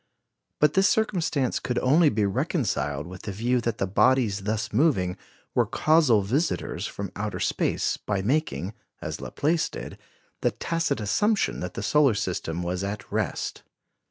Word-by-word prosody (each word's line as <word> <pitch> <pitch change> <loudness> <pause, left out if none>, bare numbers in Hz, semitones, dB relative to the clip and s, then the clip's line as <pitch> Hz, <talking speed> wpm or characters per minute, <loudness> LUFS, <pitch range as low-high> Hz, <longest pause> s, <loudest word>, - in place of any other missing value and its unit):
But 150 0 +4
this 190 +3 +4
circumstance 165 - +1
could 125 -1 -3
only 150 +5 +5
be 105 -3 +1
reconciled 75 -6 -1
with 90 +1 -9
the 100 - -5
view 120 +5 0
that 115 -1 -2
the - - 0
bodies 100 0 +2
thus 110 +2 -2
moving 105 - +2 0.4
were - - +2
casual 150 -10 +4
visitors 135 - -1
from 100 -2 -6
outer 105 0 -3
space, - - 0
by 100 -2 -2
making, 120 - 0 0.3
as - - -5
Laplace 160 +2 0
did, - - -8 0.4
the - - +3
tacit 165 -5 -1
assumption 205 - +1
that 90 0 -5
the - - -4
solar 140 -1 +4
system 90 -4 -2
was 90 +2 -2
at 100 0 -5
rest. - - -2
115 Hz, 155 wpm, -26 LUFS, 100-150 Hz, 0.4 s, only